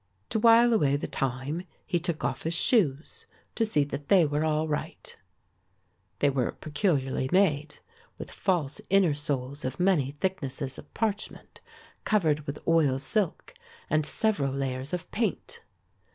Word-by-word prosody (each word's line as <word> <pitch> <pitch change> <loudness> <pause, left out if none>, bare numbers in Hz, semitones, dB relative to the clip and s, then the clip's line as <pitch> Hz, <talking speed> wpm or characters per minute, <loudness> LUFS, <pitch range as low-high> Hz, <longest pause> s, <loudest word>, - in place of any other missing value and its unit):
To 220 - +1
while 230 +1 +6
away 145 -11 +3
the 145 - -2
time 135 +5 -2 0.2
he 175 -4 0
took 170 -2 -3
off - - -2
his 165 +1 -2
shoes 160 - +1 0.3
to 230 - 0
see 215 -10 +2
that 140 0 -6
they 185 -4 +5
were 145 +1 0
all 155 0 +1
right. 150 -1 -4 1.0
They 145 - +3
were 130 -2 -1
peculiarly 145 -5 -1
made, 155 -6 +2 0.4
with - - -7
false 165 -7 -1
inner 190 -5 +4
soles 140 -1 -3
of 130 0 -4
many 170 -8 +2
thicknesses 140 -7 -3
of - - -14
parchment, 215 -2 -3 0.4
covered 155 -8 +1
with 140 +1 -7
oil 160 -5 +3
silk 175 - -1 0.4
and 155 0 +3
several 150 -4 0
layers 135 0 -3
of 180 -1 -5
paint. 460 - -2
155 Hz, 145 wpm, -28 LUFS, 140-190 Hz, 1.0 s, while